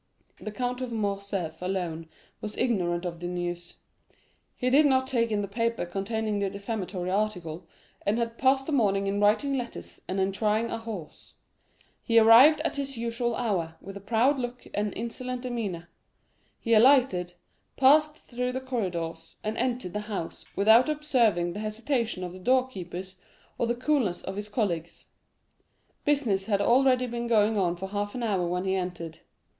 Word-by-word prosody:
The 215 - -6
Count 250 +2 -3
of 255 -2 -4
Morcerf 200 -6 -3
alone 175 -3 -3 0.3
was 210 0 -6
ignorant 180 -8 0
of 170 -1 -4
the 175 - -4
news. 175 -1 -4 0.8
He 255 0 -1
did 290 +3 +6
not 260 -1 +3
take 240 -3 0
in 210 -2 0
the - - -3
paper 230 0 -1
containing 205 +3 -2
the 200 -1 0
defamatory 200 -2 -4
article, 180 -5 -2 0.4
and 205 +3 +1
had 230 -1 -2
passed 265 0 +3
the 315 - -4
morning 200 -7 +2
in 200 +1 -1
writing 215 +7 +3
letters 245 -2 -6
and 190 +1 -2
in 190 +1 +1
trying 215 +3 0
a 230 - -3
horse. 215 -8 -9 0.7
He 230 -2 +1
arrived 235 +8 +8
at 330 - -2
his 275 -2 -4
usual 235 0 -1
hour, 175 -9 -1
with 195 +1 -10
a - - -6
proud 235 +7 +2
look 245 0 -5
and 205 0 -1
insolent 250 +2 -4
demeanor; 210 -9 -4 0.7
he 230 - 0
alighted, 220 -7 +4 0.4
passed 300 +3 +5
through 250 -3 -4
the 260 - -2
corridors, 175 -10 -4
and 215 +1 -2
entered 240 -7 -2
the 210 - -1
house 190 -6 -5
without 220 +7 +5
observing 235 - +1
the 205 - -6
hesitation 220 -1 -2
of 180 -1 -5
the 185 - -10
door 255 +6 +3
keepers 185 -4 -8 0.4
or 235 - +1
the 240 - 0
coolness 250 -8 0
of 190 - -5
his 205 +1 -5
colleagues. 175 -7 -3 0.9
40194m - - -42
Business 240 -10 +1
had 200 -3 +2
already 255 +4 +4
been 240 -1 -4
going 220 -1 +3
on 180 -4 +1
for 190 +2 -6
half 205 +2 -3
an 250 - -3
hour 195 -6 0
when 180 +2 -2
he 190 - +1
entered. 175 -3 -4
215 Hz, 170 wpm, -27 LUFS, 185-245 Hz, 0.9 s, arrived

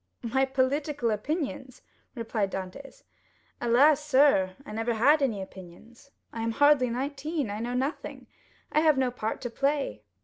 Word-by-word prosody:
"My 265 +3 +1
political 270 -1 0
opinions!" 265 - -4 0.3
replied 225 -4 -2
Dantès. 190 +9 -8 0.6
"Alas, 275 +6 +4
sir, 265 -10 +3
I - - -9
never 225 +2 -1
had 285 +7 +4
any 220 -8 0
opinions. 190 +8 -14 0.2
I 230 - -4
am 225 0 -1
hardly 285 -1 +4
nineteen; 275 +1 -3
I 205 - -4
know 240 +2 -3
nothing; 270 +5 -3 0.5
I - - +3
have 310 -3 +4
no 260 -2 +1
part 220 -3 -4
to 245 - -5
play. 275 - -1
255 Hz, 145 wpm, -27 LUFS, 225-285 Hz, 0.6 s, Alas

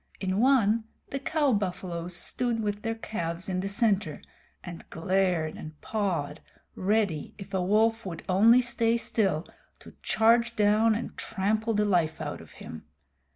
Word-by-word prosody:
In 190 0 -1
one, 230 -4 +3 0.3
the 275 - -2
cow 290 -1 +1
buffaloes 180 -3 -3
stood 240 +4 -1
with 205 -1 -2
their 225 +1 -2
calves 170 -6 -3
in 185 -1 -1
the 195 - -2
center, 200 - 0 0.4
and 175 -2 -9
glared 180 -2 0
and 155 -1 -10
pawed, 175 -9 -2 0.3
ready, 200 -5 -1
if 195 - -11
a 190 - +1
wolf 220 +4 +2
would 170 -4 -6
only 225 +7 +6
stay 235 -1 +1
still, 195 -8 0 0.3
to - - -15
charge 235 +1 +3
down 215 +1 +3
and 230 - -5
trample 220 +2 -1
the 210 0 +2
life 170 -6 +1
out - - -5
of - - -15
him. 80 - -10
205 Hz, 155 wpm, -28 LUFS, 180-225 Hz, 0.4 s, only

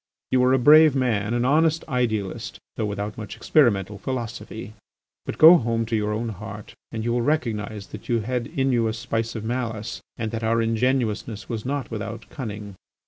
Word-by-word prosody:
You 130 - +4
were 125 0 +4
a 130 - +5
brave 150 +3 +7
man, 115 -4 +1
an 120 0 +1
honest 160 +4 +3
idealist, 110 - -2 0.2
though 105 - -1
without 105 +1 -4
much 110 - -6
experimental 105 -8 +2
philosophy. 115 -3 -5 0.5
But - - -4
go 165 +3 +10
home 115 -4 0
to 115 +1 -1
your 105 -1 0
own 115 +2 -2
heart 105 0 -8 0.2
and 110 -1 -4
you 120 - 0
will 120 - +1
recognise 110 -7 -1
that 105 - -10
you 115 -2 +2
had 120 +1 -2
in 135 -1 0
you 115 -2 +2
a 110 - -1
spice 115 0 -3
of 110 - -4
malice 115 -1 -3 0.2
and 110 -2 -3
that 115 0 -4
our 115 +1 +2
ingenuousness 115 -2 0
was 115 -2 -4
not 135 -3 -3
without 110 +1 -5
cunning. 105 -7 -6
115 Hz, 190 wpm, -24 LUFS, 105-125 Hz, 0.5 s, go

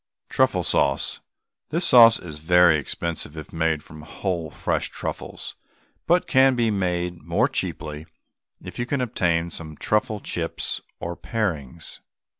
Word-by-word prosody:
TRUFFLE - - +2
SAUCE. 70 -1 +1 0.5
This 170 +4 +1
sauce 115 -2 +8
is 75 -4 -8
very 85 0 +5
expensive 80 +1 -4
if 75 - -9
made 80 -2 0
from 75 -1 -12
whole 85 +1 -3
fresh - - -2
truffles, - - -6 0.5
but 175 +1 +3
can 130 0 +4
be 115 -2 +2
made 90 -3 -1
more - - +1
cheaply 75 +1 -4 0.5
if - - -9
you 120 - -1
can 140 - -1
obtain 85 -8 0
some 80 -2 -7
truffle 105 0 0
chips - - -3 0.2
or 85 0 -4
parings. 85 - -4
85 Hz, 135 wpm, -24 LUFS, 80-110 Hz, 0.5 s, sauce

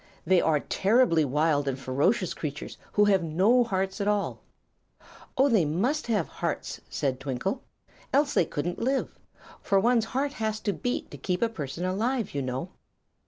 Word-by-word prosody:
They 185 -1 +4
are 155 -2 +2
terribly 200 -5 +3
wild 145 +1 +1
and 135 -1 -1
ferocious 140 - 0
creatures, 145 -2 -6
who 210 - +4
have 195 -3 +4
no 190 +10 +3
hearts 190 -3 -2
at 200 - -1
all." 210 -1 0 1.0
"Oh, 270 +2 +5
they 225 -9 +4
must 225 - 0
have 210 -8 +1
hearts," - - -4
said 130 -2 -1
Twinkle, 135 - -3 0.5
"else 285 +1 +2
they - - +3
couldn't 170 +5 -3
live. 265 +3 0 0.5
For 195 -2 +2
one's 230 +1 +3
heart 275 +4 -2
has 215 -2 -2
to 205 - 0
beat 245 +3 -3
to - - -9
keep 180 +2 -1
a 230 - +2
person 165 -4 -5
alive, 225 +4 -1
you 140 - -1
know." 130 +6 -3
190 Hz, 165 wpm, -27 LUFS, 155-230 Hz, 1.0 s, Oh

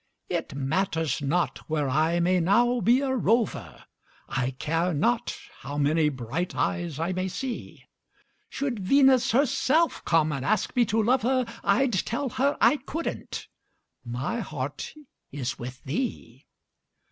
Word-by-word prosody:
It - - -3
matters 160 +1 0
not 165 +5 0
where 150 -2 0
I 155 +6 +2
may 180 +1 +3
now 240 +8 +3
be 240 +7 +4
a 265 -2 0
rover, 230 -2 0 0.4
I 130 -2 -1
care 165 +6 -1
not 235 +10 0 0.2
how 145 +1 -6
many 150 +2 +3
bright 135 +6 -4
eyes 175 -5 -1
I 165 +4 -1
may 185 +1 -1
see; 245 +6 -6 0.7
Should 265 -6 -3
Venus 260 +4 +4
herself 275 +5 +2
come 160 -2 +2
and 135 -3 -3
ask 210 +5 0
me 245 -1 +4
to 220 +1 +1
love 250 +4 +3
her, 255 +1 +1 0.2
I'd 240 +5 +2
tell 235 +8 -1
her 280 +4 0
I 300 - +5
couldn't 315 +5 -5 0.6
my 130 - -3
heart 145 - -5 0.4
is 135 -2 -4
with 125 +2 -8
thee. 140 - -4
185 Hz, 140 wpm, -26 LUFS, 145-245 Hz, 0.7 s, I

